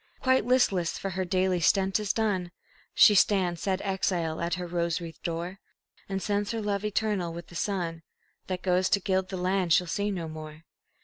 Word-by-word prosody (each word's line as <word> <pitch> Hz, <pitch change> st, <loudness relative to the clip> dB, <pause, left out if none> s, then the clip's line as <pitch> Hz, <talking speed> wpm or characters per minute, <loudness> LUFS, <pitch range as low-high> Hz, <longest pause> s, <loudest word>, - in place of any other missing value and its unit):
Quite 260 Hz, 0 st, +2 dB
listless, 200 Hz, -9 st, +2 dB
for 195 Hz, -, -4 dB
her 185 Hz, +1 st, -2 dB
daily 185 Hz, 0 st, +1 dB
stent 190 Hz, +4 st, +2 dB
is 210 Hz, -2 st, 0 dB
done, 200 Hz, -6 st, 0 dB, 0.5 s
She 210 Hz, -, +8 dB
stands, 185 Hz, -4 st, +3 dB
sad 190 Hz, -1 st, -1 dB
exile, 180 Hz, -5 st, -1 dB
at 170 Hz, +1 st, 0 dB
her 180 Hz, 0 st, -5 dB
rose 170 Hz, -1 st, -1 dB
wreathed 165 Hz, -2 st, -9 dB
door, 170 Hz, +3 st, -4 dB, 0.5 s
And 195 Hz, -1 st, -2 dB
sends 205 Hz, -1 st, 0 dB
her 225 Hz, -, -2 dB
love 200 Hz, -1 st, -1 dB
eternal 210 Hz, -5 st, -1 dB
with 170 Hz, 0 st, -9 dB
the 175 Hz, -, -13 dB
sun 170 Hz, -3 st, -2 dB, 0.5 s
That 185 Hz, -1 st, -4 dB
goes 185 Hz, 0 st, +2 dB
to 200 Hz, -, +3 dB
gild 190 Hz, -1 st, 0 dB
the 190 Hz, -, -4 dB
land 180 Hz, -1 st, +1 dB
she'll 180 Hz, -, +4 dB
see 200 Hz, +5 st, -1 dB
no 175 Hz, -5 st, -3 dB
more. 155 Hz, 0 st, -9 dB
185 Hz, 190 wpm, -28 LUFS, 170-200 Hz, 0.5 s, She